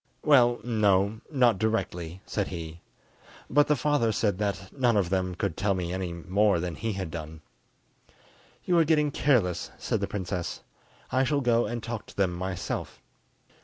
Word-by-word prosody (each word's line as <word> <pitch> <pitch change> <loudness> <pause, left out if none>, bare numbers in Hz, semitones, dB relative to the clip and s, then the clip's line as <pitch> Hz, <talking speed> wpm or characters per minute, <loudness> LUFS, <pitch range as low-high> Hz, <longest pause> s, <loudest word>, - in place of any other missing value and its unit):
"Well, 120 -5 +5
no; 105 -2 +2
not 125 -8 +3
directly," 95 -5 -2
said 100 -2 -2
he; 85 -2 -7 0.7
"but 145 +2 +5
the 150 - +3
father 145 -4 +1
said 100 -3 0
that 100 -2 -3
none 120 -5 +3
of 95 -3 +1
them 90 -1 0
could 90 -2 -2
tell 100 0 +1
me 90 -1 -3
any 95 -2 -3
more 95 +3 +1
than 90 0 -3
he 110 +6 -3
had 95 -4 -4
done." 80 -1 -7 1.2
"You 175 -1 +3
are - - +6
getting 150 -2 +2
careless," 110 - +1
said - - -1
the - - -2
princess; 90 -3 -4 0.5
"I 130 - +3
shall 140 +1 +1
go 120 -2 +2
and 120 -1 -4
talk 115 -1 -5
to - - -15
them 95 -3 +2
myself." 95 +1 -4
100 Hz, 165 wpm, -27 LUFS, 90-120 Hz, 1.2 s, are